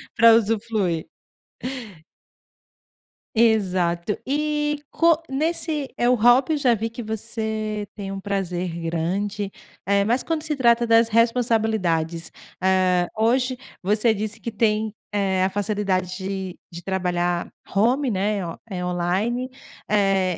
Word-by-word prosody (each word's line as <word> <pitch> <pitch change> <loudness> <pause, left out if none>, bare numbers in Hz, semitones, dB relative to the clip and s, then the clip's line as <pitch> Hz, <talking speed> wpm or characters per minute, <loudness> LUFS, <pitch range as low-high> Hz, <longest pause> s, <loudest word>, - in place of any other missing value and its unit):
Pra 230 -1 +7
usufruir 210 -6 0 2.3
Exato, 190 -5 +2
e 295 +1 0
co 335 -2 +4
nesse 305 0 -2
é, 240 - +2
o 250 - +5
hobby 245 +6 +4
eu - - +1
já 255 -5 +3
vi 225 +1 -2
que 230 +2 -7
você 220 -1 -3
tem 195 -2 -5
um 195 - -4
prazer 185 -3 -2
grande, 195 +5 -2 0.4
eh, 200 0 +3
mas 240 +4 +2
quando 320 -2 -2
se 305 -2 -1
trata 235 -2 +4
das 230 0 +4
responsabilidades, 220 -8 +1 0.3
ah, 185 -1 +3
hoje 250 +3 +2 0.2
você 210 +4 +2
disse 215 +1 -4
que 235 - -5
tem, 215 0 +1 0.2
eh, 195 -2 +1
a 190 - +2
facilidade 195 -3 -1
de 190 -1 -5
de 170 0 -9
trabalhar 175 -2 -1 0.2
home, 245 +6 +3
né, 205 +1 0 0.3
eh, 180 -3 -3
online, 190 +9 -1 0.4
eh, 195 -3 +2
210 Hz, 125 wpm, -23 LUFS, 185-235 Hz, 2.3 s, Pra